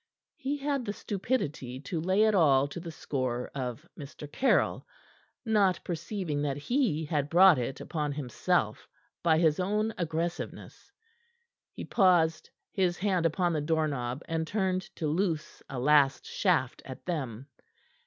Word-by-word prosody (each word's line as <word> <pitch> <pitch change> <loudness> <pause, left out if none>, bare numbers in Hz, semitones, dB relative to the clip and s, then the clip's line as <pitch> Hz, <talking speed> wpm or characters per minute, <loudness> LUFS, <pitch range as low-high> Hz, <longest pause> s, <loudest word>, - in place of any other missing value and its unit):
He 280 +2 -2
had 280 -2 -1
the 205 -3 -3
stupidity 160 - -3
to 160 +3 -3
lay 190 +5 +3
it 220 -1 +4
all 140 -7 +4
to 175 - -6
the 170 0 -7
score 130 -5 -3
of 130 +4 -5
Mr. 145 -1 -9
Caryll, 260 - +2 0.6
not 205 -5 +3
perceiving 170 -3 -3
that 145 -2 -1
he 175 - 0
had 145 -2 -1
brought 175 -2 +7
it 125 +2 -3
upon 150 -3 -3
himself 135 -5 -1 0.3
by 165 -2 +4
his 160 -1 +3
own 210 +4 0
aggressiveness. 170 +1 -4 0.8
He - - -7
paused, 175 -5 +3 0.2
his 180 -3 +1
hand 185 -4 +2
upon 175 +2 0
the 155 - 0
doorknob, 145 -4 -1
and 160 -1 -2
turned 190 -2 0
to 160 - -3
loose 160 0 -1
a 135 - -5
last 140 +1 +3
shaft 160 -10 0
at 130 -1 -10
them. 135 -8 -3
160 Hz, 145 wpm, -29 LUFS, 145-185 Hz, 0.8 s, brought